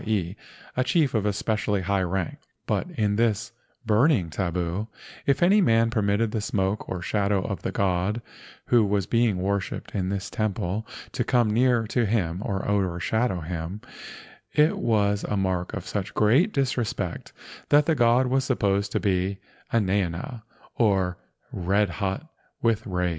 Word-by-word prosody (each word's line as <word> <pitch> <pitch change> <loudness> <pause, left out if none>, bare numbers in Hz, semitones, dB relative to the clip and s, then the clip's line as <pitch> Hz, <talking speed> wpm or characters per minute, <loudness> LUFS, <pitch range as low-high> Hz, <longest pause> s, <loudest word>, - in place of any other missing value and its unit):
e., 95 -4 -1 0.4
a 130 - +2
chief 140 +1 +2
of 105 -2 +1
especially 105 0 0
high 95 +1 0
rank; 95 -1 -2 0.3
but - - -1
in 105 -2 +1
this 115 -3 +1 0.3
"burning 110 - +3
tabu," 90 +3 -2 0.4
if 140 +4 +3
any 200 +4 +5
man 115 -7 +3
permitted 105 0 +1
the 110 - -1
smoke 100 0 -1
or 90 -1 -4
shadow 100 -1 +1
of - - -4
the - - -3
god 95 +3 0 0.5
who 120 -2 +4
was 100 -2 +1
being 115 -2 +2
worshipped 100 +1 -2
in 95 -3 -1
this 100 0 -3
temple 105 0 -2 0.2
to - - -1
come 120 -4 +2
near 120 0 +3
to 115 +1 0
him 95 -5 0
or 100 -4 -2
overshadow 95 +1 0
him, 85 +4 -5 0.7
it 150 +2 +4
was 105 -3 +1
a 105 - -1
mark 95 -2 -1
of 100 -5 -5
such 100 -2 -4
great 130 - +4
disrespect 125 - -2 0.4
that 145 0 +5
the 160 - +3
god 120 -1 +4
was 130 +1 +1
supposed 100 -6 0
to - - 0
be 95 -1 0 0.3
enaena, 100 - 0 0.4
or 95 -5 +2 0.4
red 100 +3 +1
hot 100 +8 -3 0.4
with 115 -2 +1
rage. 90 -2 0
105 Hz, 155 wpm, -25 LUFS, 95-115 Hz, 0.7 s, any